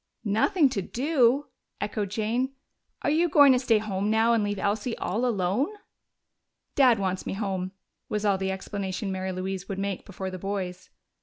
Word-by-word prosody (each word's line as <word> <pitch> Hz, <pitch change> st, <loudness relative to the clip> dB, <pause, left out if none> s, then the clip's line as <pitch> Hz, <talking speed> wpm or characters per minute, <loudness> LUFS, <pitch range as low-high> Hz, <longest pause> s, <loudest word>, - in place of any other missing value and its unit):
"Nothing 225 Hz, -, +3 dB
to 200 Hz, -, -2 dB
do?" 270 Hz, -, +2 dB, 0.3 s
echoed 205 Hz, -1 st, -2 dB
Jane. 230 Hz, +6 st, -1 dB, 0.5 s
"Are -, -, +2 dB
you 335 Hz, +3 st, +3 dB
going 285 Hz, -2 st, +7 dB
to 250 Hz, -, +3 dB
stay 240 Hz, -3 st, +3 dB
home 205 Hz, -1 st, -2 dB
now 225 Hz, +2 st, +4 dB
and 225 Hz, -2 st, +2 dB
leave 205 Hz, 0 st, -1 dB
Elsie 210 Hz, +4 st, -1 dB
all 230 Hz, +7 st, -1 dB
alone?" 205 Hz, +3 st, +1 dB, 1.1 s
"Dad 255 Hz, -5 st, +5 dB
wants 190 Hz, -2 st, -2 dB
me -, -, -2 dB
home," 190 Hz, -2 st, -2 dB, 0.4 s
was 210 Hz, 0 st, -1 dB
all 200 Hz, -2 st, +2 dB
the 190 Hz, 0 st, -1 dB
explanation 190 Hz, 0 st, -3 dB
Mary 190 Hz, 0 st, -2 dB
Louise 190 Hz, +1 st, -4 dB
would 195 Hz, -, -3 dB
make 195 Hz, -1 st, -3 dB
before 190 Hz, -1 st, -6 dB
the 185 Hz, -, -6 dB
boys. 185 Hz, -2 st, -4 dB
205 Hz, 170 wpm, -27 LUFS, 190-235 Hz, 1.1 s, going